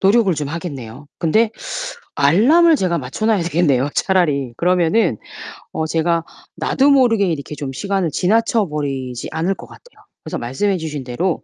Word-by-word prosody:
노력을 200 0 +4
좀 145 -2 -3
하겠네요. 145 -6 -7
근데 215 +7 +2 0.6
알람을 260 - +5
제가 180 -7 0
맞춰 130 +10 -5
놔야 220 -4 +3
되겠네요 155 -6 +1
차라리. 150 -10 +1
그러면은 180 - +2 0.6
어 160 - -2
제가 165 +1 +1 0.3
나도 275 +2 +2
모르게 240 -7 +4
이렇게 150 -4 -3
좀 140 -2 -5
시간을 195 +3 -1
지나쳐버리지 150 - -1
않을 170 +4 0
것 - - -12
같아요. 485 - -18 0.2
그래서 - - -4
말씀해 185 +12 -1
주신 155 -4 -5
대로 160 +9 -2
170 Hz, 350 characters per minute, -19 LUFS, 145-200 Hz, 0.6 s, 알람을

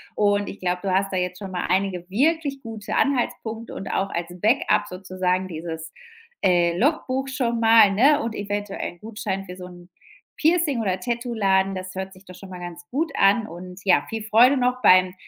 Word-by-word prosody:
Und 205 -1 +2
ich 200 - -8
glaub, 180 0 -1
du 190 -2 -1
hast 195 0 +1
da 185 - -1
jetzt 180 0 -2
schon 195 -2 -7
mal 180 - -3
einige 185 -1 -1
wirklich 280 - 0
gute 225 -3 -6
Anhaltspunkte 240 -4 -1
und - - -6
auch 195 0 -1
als 170 0 -4
Backup 210 -1 +2
sozusagen 185 0 -2
dieses, 160 0 -6 0.5
äh, 175 -2 +3
Logbuch 270 - 0
schon 240 -3 -1
mal, 225 -3 +6
ne, 280 +9 +4
und 230 -1 -3
eventuell 205 -3 -4
'n 175 - -23
Gutschein 210 -3 -4
für 180 0 -9
so 180 - -8
'n 175 0 -14 0.5
Piercing 320 -5 +2
oder 190 -3 -1
Tattooladen. 200 -5 0
Das 185 0 -6
hört 190 0 -5
sich 185 +1 -17
doch 185 - -12
schon 190 +1 -12
mal 180 -1 -8
ganz 175 0 -9
gut 310 +3 -1
an 205 +3 +4
und 180 +2 -10
ja, 175 -7 +3
viel 225 -1 -4
Freude 235 +6 +5
noch 250 0 0
beim 185 0 +5
195 Hz, 190 wpm, -23 LUFS, 185-235 Hz, 0.5 s, mal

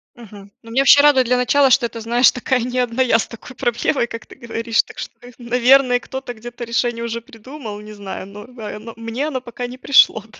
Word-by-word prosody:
Мгм. 205 -4 -13
Ну 230 - -13
меня 265 +3 +2
вообще 285 +1 +7
радует 285 -3 +5
для 250 0 +2
начала, 270 +3 +3
что 255 -2 +4
это, 230 -1 -6
знаешь, 240 +2 +4
такая 255 +1 -1
не 250 +2 -2
одна 245 +1 0
я 240 -3 +4
с - - -2
такой 240 +2 -12
проблемой, 240 +1 0
как 230 +1 -8
ты - - -15
говоришь. 230 -1 -1
Так - - -16
что - - -7
и, 245 - -12
наверное, 250 +1 +3
кто-то 265 -1 -7
где-то 240 +2 -9
решение 235 0 -1
уже 235 0 -4
придумал, 225 -1 -10
не 210 0 -11
знаю, 195 -2 -8
но 210 +2 -11
в 250 -1 -17
а, 210 -1 -6
но 230 +1 -10
мне 230 +6 -4
оно 265 -4 -3
пока 245 0 -6
не 250 +1 -10
пришло, 260 -5 +4
да. 220 +1 -19
240 Hz, 235 wpm, -19 LUFS, 230-255 Hz, -, вообще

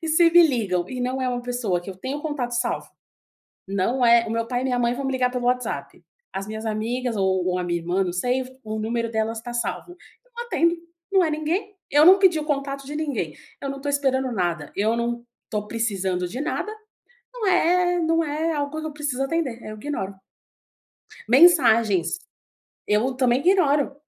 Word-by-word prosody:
e 325 - -3
se 335 +1 +5
me 345 +1 +8
ligam 190 - -1
e 255 - -5
não 255 +2 -1
é 255 - 0
uma 245 -1 -2
pessoa 240 -8 -1
que 195 - -7
eu 185 - -10
tenho 265 +9 -4
o - - -11
contato 275 -6 -3
salvo, 240 0 -1 0.8
não 230 +6 +1
é, 235 0 +6
o - - -3
meu 230 0 -1
pai 245 0 -1
e - - -3
minha 250 -1 0
mãe 240 0 +2
vão 275 +2 -5
me 270 - -1
ligar 255 -1 +1
pelo 250 -1 -3
WhatsApp, 250 0 -2 0.3
as 195 +2 -4
minhas 220 +1 -6
amigas 230 +3 -2
ou 190 -2 +1
ou 180 0 0
a - - -2
minha 175 -1 -1
irmã, 180 +3 0
não 175 - -3
sei, 250 +7 0 0.2
o 215 0 -4
número 230 +1 -1
delas 220 0 -1
tá 240 +1 -7
salvo. 240 +8 -3 0.3
Eu - - -32
não 475 0 -5
atendo, 335 -7 +2 0.4
não 385 -2 +5
é 320 - +1
ninguém, 340 +7 -2 0.2
eu 295 +2 +6
não 380 +2 +9
pedi 360 -5 +4
o 300 - -5
contato 275 -2 -2
de 295 +2 -6
ninguém, 275 - -2 0.3
eu 275 - -3
não 275 0 -6
tô 285 - -2
esperando 265 -2 +1
nada, 170 -7 -2
eu 220 +3 +1
não 235 0 -2 0.3
tô 210 -2 -3
precisando 195 -6 -1
de 245 +9 -6
nada, 355 +6 -2 0.6
não 450 -4 -3
é 355 0 +3
não 330 0 +2
é 310 +3 -1
algo 290 +1 -3
que 315 - -5
eu 305 - -5
preciso 290 -3 -3
atender, 270 -6 -2
eu 215 0 -7
ignoro. 210 -6 -4 1.1
Mensagens, 235 - +5 0.7
eu 215 +6 +2
também 255 -1 +2
ignoro. 290 -5 +2
250 Hz, 205 wpm, -24 LUFS, 220-295 Hz, 1.1 s, não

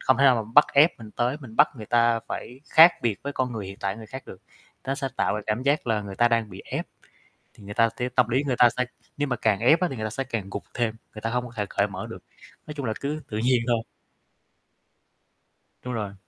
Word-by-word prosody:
không 130 - +3
thể 140 - +4
nào 130 - +7
mà 110 - -14
bắt 145 - +8
ép 150 +1 +5
mình 110 -2 -10
tới, 120 +5 -1
mình 115 -4 -11
bắt - - +6
người 110 - -8
ta 115 0 +3
phải 125 +2 -6
khác 165 +2 +9
biệt 115 -4 -1
với 140 - -4
con 130 -2 -1
người 105 -4 -5
hiện 95 +1 -9
tại 100 +1 -2
người 110 - -10
khác 130 +4 -8
được, 95 - -10 0.5
nó 135 - -1
sẽ 135 -2 -3
tạo - - +1
ra 105 - -2
cảm 110 +4 -1
giác 145 +1 +1
là 110 -2 +1
người 100 -1 -7
ta 120 +4 +4
đang 115 -2 0
bị 95 +1 -10
ép. - - -4 0.7
Thì 105 - -16
người 105 +1 -7
ta 115 -1 +4
sẽ 125 +1 -1
tâm 125 -2 +2
lý 130 +4 +1
người 130 -3 0
ta 120 - +8
sẽ 125 +2 -1 0.3
nếu 145 -1 -1
mà 125 - 0
càng 110 -2 +1
ép 155 +8 +5
á, 180 - +2
thì 135 - -5
người 110 -1 -3
ta 110 - -4
sẽ 135 +4 -3
càng 115 -6 -4
gục 100 - -5
thêm, 115 -2 0 0.2
người 110 - -8
ta 115 - -2
hông 125 +1 -1
có 120 - -11
thể 105 -2 -1
cởi - - +1
mở - - -6
được. - - -9 0.4
Nói 150 - -7
chung 140 -3 -4
là 110 - 0
cứ 150 +2 -3
tự 105 - -3
nhiên 120 +1 +2
thôi. 120 -2 +2 2.0
Đúng 125 -1 -5
rồi. 105 -3 -4
120 Hz, 270 wpm, -25 LUFS, 110-130 Hz, 2.0 s, khác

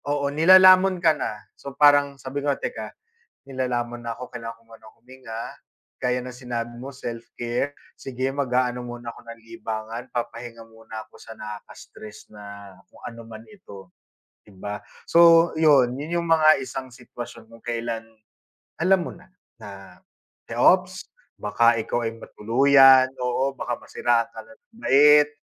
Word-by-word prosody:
Oo, 145 -1 -1
nilalamon 185 +3 +6
ka 170 -2 +3
na. 105 -8 -6
So 140 -1 -11
parang 145 -1 +4
sabi 135 +2 -6
ko, 145 - -1
"Teka, - - -6 0.6
nilalamon 120 -2 -3
na 115 - -3
ako. 125 +2 -9
Kailangan 115 -1 -8
ko - - -26
munang 115 -1 -16
huminga." 120 -2 -9 0.4
Gaya 125 0 -1
ng 125 0 -9
sinabi 120 -2 -5
mo 130 +3 -8
self-care. 120 +1 -5 0.2
Sige, 130 0 -4
mag-aano 125 -2 -1
muna 120 0 -8
ako 115 - -10
ng 115 0 -11
libangan, 115 0 -7
papahinga 115 -1 -6
muna 115 -1 -10
ako - - -19
sa - - -12
nakaka-stress 105 0 -11
na 100 -2 -12 0.2
kung - - -18
ano 115 0 -11
man 110 -1 -11
ito, 100 - -14 0.6
di 105 - -19
ba? 100 +2 -7 0.3
So 170 0 +6
yun. 140 -6 +4
Yun 160 +5 -3
yung 170 - -6
mga 155 -2 +5
isang 130 0 -7
sitwasyon 120 -2 -11
kung 115 0 -17
kailan, 115 -1 -4 0.8
alam 185 +3 +3
mo - - -7
na, 180 - -19 0.3
na 100 -4 -12 0.5
te, - - -8
ops. - - +3 0.3
Baka 115 +3 +3
ikaw 120 +2 -3
ay 115 - -2
matuluyan. 135 +3 +5
Oo, 130 +2 -1
baka 120 -1 -4
masiraan 120 -1 0
ka 110 - -11
ng 110 0 -19 0.3
bait, 150 +2 +6
120 Hz, 150 wpm, -23 LUFS, 115-140 Hz, 0.8 s, nilalamon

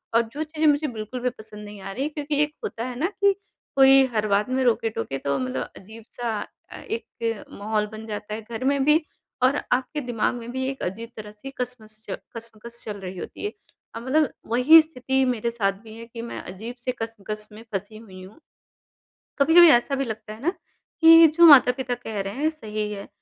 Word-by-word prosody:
और 230 - +6
जो 235 +5 -9
कुछ 310 0 -4
चीज़ें 310 0 +2
मुझे 290 +1 0
बिल्कुल 225 +1 -6
भी 250 - +1
पसंद 215 -3 -11
नहीं 205 -1 -10
आ 195 +1 -6
रही 260 +7 -3
है 300 - -1
क्योंकि 295 -1 -2
एक 300 0 -3
होता 230 - -4
है 250 - -5
ना 330 - +2
कि 400 0 +5 0.4
कोई 270 0 +7
हर 215 0 +1
बात 205 +3 +1
में 260 0 +1
रोक-टोके 225 - 0
तो 140 0 -1
मतलब 130 0 -3
अजीब-सा 225 +3 -7 0.4
अ, - - -8
एक 235 - -4
माहौल 210 +1 -1
बन 220 +1 -8
जाता 210 0 -5
है 220 - -4
घर 225 +2 -7
में 280 0 +2
भी 305 +2 +4 0.4
और 270 +3 +3
आपके 260 +4 0
दिमाग 230 +1 0
में 235 0 -7
भी 260 +1 -2
एक 270 - -6
अजीब 225 +6 -4
तरह 210 -1 -8
से 215 +6 -10
कसमस 220 -3 -6 0.3
कश्मकश 230 +1 -5
चल 205 -2 -5
रही 185 -1 -7
होती 400 - -7
है। 415 - -2 0.4
और 230 - -5
मतलब 300 +2 +2 0.2
वही 255 +8 +7
स्थिति 265 -3 -1
मेरे 235 -2 -1
साथ 200 -4 0
भी 220 -1 -12
है 230 - -9
कि 230 0 -9
मैं 235 - -6
अजीब 220 +7 -8
से 255 +1 -2
कश्मकश 215 -1 -2
में 215 +2 -12
फँसी 205 +3 -4
हुई 190 -4 -12
हूँ। 195 +10 -14 1.0
कभी-कभी 330 +4 +8
ऐसा 245 +4 +3
भी 275 - -1
लगता 220 -1 -6
है 220 - -13
ना 335 - +1 0.5
कि 330 0 +9
जो 340 - +8
माता-पिता 255 -3 +6
कह 225 -4 -6
रहे 195 +1 -5
हैं 305 +3 +1
सही 215 -8 -5
है, 200 -1 -7
230 Hz, 210 wpm, -24 LUFS, 215-270 Hz, 1.0 s, कि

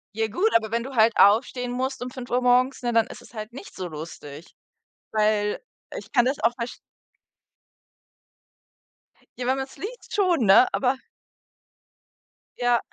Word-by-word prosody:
Ja 225 0 0
gut, 375 - 0
aber 220 -2 +3
wenn 230 +1 -1
du 270 +2 -8
halt 225 -1 +3
aufstehen 245 +4 +3
musst 260 0 -3
um 250 - -6
5:00 250 -1 -2
morgens, 250 +2 +2
ne, 240 -1 -1
dann 230 0 +3
ist - - -11
es - - -18
halt 215 0 -7
nicht 275 - -11
so 185 -1 -5
lustig. 155 -1 -9 0.6
Weil 210 -1 +1 0.4
ich - - -11
kann 240 -4 +4
das 265 +3 0
auch 230 +2 +3
versch 235 0 -5 2.6
Ja, 245 - -4
wenn 260 +1 +2
man's 265 0 -6
liest 470 +4 -8
schon, 360 - +2
ne? 195 +6 +7
Aber 260 0 +1 1.6
Ja. 245 -1 +2
245 Hz, 155 wpm, -24 LUFS, 220-260 Hz, 2.6 s, ne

